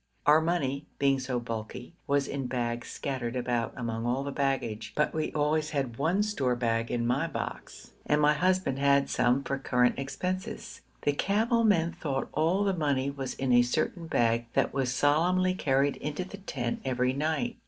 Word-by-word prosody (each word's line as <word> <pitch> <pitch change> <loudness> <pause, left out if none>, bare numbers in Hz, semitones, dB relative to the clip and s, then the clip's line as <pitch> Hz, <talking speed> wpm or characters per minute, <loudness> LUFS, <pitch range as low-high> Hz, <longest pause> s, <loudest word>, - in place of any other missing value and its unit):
Our 150 +2 +6
money, 150 -4 -1
being 140 -1 +2
so 130 -1 -2
bulky, 115 +4 -6
was 140 -1 +2
in 135 -2 -3
bags 120 -1 -2
scattered 130 -3 -4
about 120 -2 -1
among 115 -1 -3
all 130 +3 0
the 140 - -4
baggage, 125 -6 -2
but 150 - +1
we 155 -1 -1
always 150 +1 +1
had 135 -6 -2
one 175 +8 +2
store 140 -13 0
bag 115 -1 0
in 120 -1 -1
my 135 +7 +1
box, - - -6 0.2
and 150 - +3
my 150 0 +5
husband 180 -4 +1
had 140 0 +3
some 125 +2 +2
for 140 0 -2
current 125 -2 +2
expenses. 185 +10 -4 0.2
The 145 - +2
camel 225 - +1
men 170 -6 +3
thought 145 -6 -3
all 170 +6 +2
the 195 -1 +1
money 140 -5 0
was 135 -2 -5
in 130 -2 0
a 120 - +7
certain 155 +7 -1
bag 115 -4 +1
that - - +1
was 135 -3 0
solemnly 180 +7 +2
carried 140 -5 +1
into 150 +5 -3
the 200 - -9
tent 125 -11 -4
every 125 -1 0
night. 160 - -1
140 Hz, 180 wpm, -29 LUFS, 125-160 Hz, 0.2 s, a